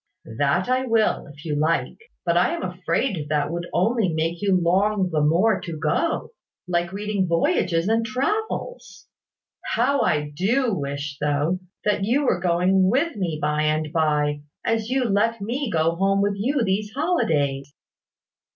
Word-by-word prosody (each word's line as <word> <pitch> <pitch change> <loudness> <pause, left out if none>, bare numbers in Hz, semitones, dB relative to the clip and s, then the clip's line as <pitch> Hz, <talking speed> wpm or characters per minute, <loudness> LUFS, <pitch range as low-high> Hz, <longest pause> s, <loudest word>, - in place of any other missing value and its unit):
"That 145 +6 +2
I 255 +1 +1
will, 225 -2 +1
if 145 +1 -14
you 150 -2 -1
like. 155 +3 0 0.3
But 170 -1 +2
I 175 +1 +3
am - - -6
afraid 180 - -2
that 150 0 0
would 170 0 -4
only 215 -1 +1
make 165 +2 -2
you 195 -3 +3
long 190 +2 +1
the 155 -1 +1
more 185 +8 +3
to 170 -4 -6
go, 240 - -1 0.4
like 175 -1 0
reading 200 -1 -1
Voyages 170 +1 +1
and 225 +1 +2
Travels. 425 - -3 0.7
How 275 +4 +2
I 150 -2 0
do 230 - +1
wish, 140 -2 -4
though, 150 +4 0 0.3
that 205 -1 +1
you 260 +8 +1
were 185 - +2
going 185 +2 +2
with 280 - +1
me 175 -6 -2
by 150 0 0
and 155 0 0
by, 150 -2 +1 0.2
as 225 0 0
you 260 0 +1
let 225 +2 +1
me 240 +6 -3
go 165 -2 +1
home 195 +2 +2
with 205 0 +1
you 250 +6 0
these 205 +1 -1
holidays!" 145 - 0
185 Hz, 160 wpm, -23 LUFS, 155-225 Hz, 0.7 s, I